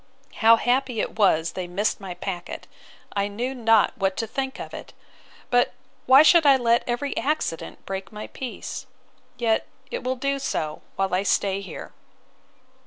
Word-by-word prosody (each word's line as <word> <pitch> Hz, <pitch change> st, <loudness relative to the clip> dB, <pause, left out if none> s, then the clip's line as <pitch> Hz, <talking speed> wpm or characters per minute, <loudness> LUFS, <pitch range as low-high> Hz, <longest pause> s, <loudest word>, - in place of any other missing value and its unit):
—How 230 Hz, 0 st, +7 dB
happy 245 Hz, 0 st, 0 dB
it 215 Hz, -, -3 dB
was 165 Hz, -5 st, +3 dB
they 185 Hz, -1 st, -5 dB
missed 200 Hz, +4 st, -1 dB
my 185 Hz, -2 st, -6 dB
packet! 175 Hz, -2 st, -5 dB, 0.5 s
I 200 Hz, 0 st, +1 dB
knew 240 Hz, +6 st, -3 dB
not 225 Hz, -4 st, +3 dB
what 195 Hz, -5 st, -1 dB
to 225 Hz, -, -1 dB
think 265 Hz, +4 st, -4 dB
of -, -, -7 dB
it!—But 245 Hz, 0 st, -3 dB, 0.3 s
why 265 Hz, +3 st, +9 dB
should 335 Hz, +1 st, +6 dB
I 280 Hz, -2 st, +6 dB
let 235 Hz, -1 st, +3 dB
every 250 Hz, +4 st, -2 dB
accident 290 Hz, -, -2 dB
break 195 Hz, 0 st, -5 dB
my 210 Hz, 0 st, -7 dB
peace? 255 Hz, -3 st, -7 dB, 0.5 s
Yet 225 Hz, -2 st, +1 dB, 0.2 s
it 485 Hz, -, -4 dB
will 255 Hz, +1 st, -1 dB
do 275 Hz, +2 st, -1 dB
so, 155 Hz, -, -3 dB
while 195 Hz, -1 st, -1 dB
I 185 Hz, -, +3 dB
stay 195 Hz, 0 st, +1 dB
here. 190 Hz, -4 st, -8 dB
225 Hz, 160 wpm, -24 LUFS, 195-260 Hz, 0.5 s, why